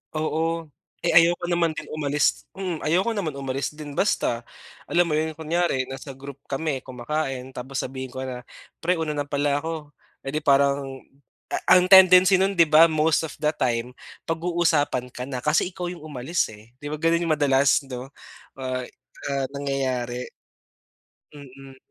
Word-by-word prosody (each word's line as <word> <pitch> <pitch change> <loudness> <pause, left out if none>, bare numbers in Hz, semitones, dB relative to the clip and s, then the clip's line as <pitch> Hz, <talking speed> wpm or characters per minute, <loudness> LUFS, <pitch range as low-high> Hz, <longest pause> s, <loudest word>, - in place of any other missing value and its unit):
Oo. 160 0 -1 0.3
Eh, 170 - +2
ayoko 170 +1 +5
naman 170 -2 +1
din 155 - -5
umalis. 150 -1 0
Mm, 180 -4 -3
ayoko 185 +9 +1
naman 170 -9 -3
umalis 135 0 -2
din 150 -2 -8
basta. 120 - 0 0.5
Alam 175 -2 +2
mo - - +1
'yon 155 +1 -1
kunyari 160 -4 0
nasa 135 +1 -8
group 140 0 -10
kami 140 0 -2
kumakain 130 0 -4
tapos 130 +2 -4
sabihin 130 0 -6
ko 130 +1 -6
na 125 -1 -6 0.4
"Pre 180 +2 +1
una 160 -2 -2
na 145 -1 -3
pala 145 0 0
ako." 160 -2 -6 0.3
Eh, 135 - -3
di 155 - 0
parang 140 -2 +2 0.5
a - - -3 0.2
ang 180 - +3
tendency 185 0 +8
no'n 195 -1 +1
'di 170 - +7
ba 160 +2 +7
most 155 0 +2
of 160 - -4
the 150 0 +1
time 125 0 -1 0.3
pag-uusapan 165 -6 0
ka 125 - -5
na 130 - -3
kasi 150 +4 +2
ikaw 180 -1 -6
'yong 175 -4 -10
umalis, 150 +1 -2
eh. 110 +3 -16
'Di 145 - -6
ba 155 - -3
gano'n 165 +2 +2
'yong 160 -2 +2
madalas 140 -1 +3
'no, 130 0 -7 0.5
ah, 130 -1 -3 0.5
ah, 140 -1 0
nangyayari? 130 -3 -2 1.1
Mm. 135 -1 -13
145 Hz, 165 wpm, -24 LUFS, 135-165 Hz, 1.1 s, tendency